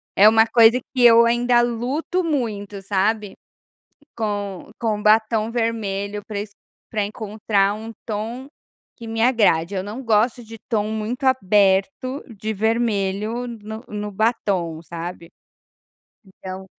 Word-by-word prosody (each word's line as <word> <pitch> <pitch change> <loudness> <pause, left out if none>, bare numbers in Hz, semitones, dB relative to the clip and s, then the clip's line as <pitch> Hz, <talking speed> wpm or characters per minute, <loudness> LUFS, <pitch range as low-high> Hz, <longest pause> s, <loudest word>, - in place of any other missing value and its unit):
É 205 +2 +8
uma 225 0 +5
coisa 230 +1 +5
que 255 -2 +1
eu 235 0 +8
ainda 240 +1 +3
luto 255 +10 -1
muito, 210 -10 -3
sabe, 205 +1 0 0.8
com 205 -4 -4
com 215 -3 -1
batom 220 +1 +3
vermelho 210 -3 -2
pra 205 -2 -4
esc 205 0 -8 0.4
pra 210 -2 0
encontrar 205 -1 0
um 220 +2 -8
tom 230 +5 -5 0.5
que 230 - -10
me 225 0 -2
agrade, 205 -8 +3
eu 190 - -1
não 210 +7 -7
gosto 230 +1 +2
de 225 0 -11
tom 215 -3 0
muito 220 +5 -4
aberto 210 +3 +2
de 215 +2 -3
vermelho 220 +1 -1
no 220 -1 -8
no 210 0 -5
batom, 190 -7 -1
sabe. 170 0 -7 1.0
Então 190 0 -9
215 Hz, 130 wpm, -22 LUFS, 200-235 Hz, 1.0 s, É